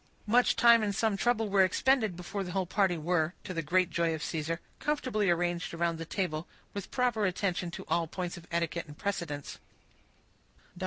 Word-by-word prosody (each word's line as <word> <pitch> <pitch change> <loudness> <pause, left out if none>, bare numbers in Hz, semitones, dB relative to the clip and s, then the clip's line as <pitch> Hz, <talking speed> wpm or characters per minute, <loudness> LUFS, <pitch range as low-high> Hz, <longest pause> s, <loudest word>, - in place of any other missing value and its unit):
Much 240 +3 +4
time, 235 -1 +7
and 205 -2 -1
some 220 -1 +1
trouble 225 +1 +1
were 195 -1 +4
expended 220 0 +2
before 185 +3 -4
the 180 -2 -6
whole 190 -1 0
party 185 -1 +1
were, 160 +1 0
to 185 - -5
the 165 - -1
great 180 +3 +2
joy 165 0 +1
of 155 - -6
Caesar, 165 +1 -2 0.2
comfortably 255 -9 0
arranged 175 0 0
around 170 -1 0
the 165 - -4
table, 165 -3 -2 0.3
with 200 -2 -5
proper 240 -5 +1
attention 180 -1 -1
to 170 - -8
all 170 -1 +1
points 180 +1 -4
of 175 -1 -12
etiquette 170 0 -1
and 150 0 -11
precedence. 170 -8 -4
180 Hz, 180 wpm, -30 LUFS, 170-205 Hz, 0.3 s, time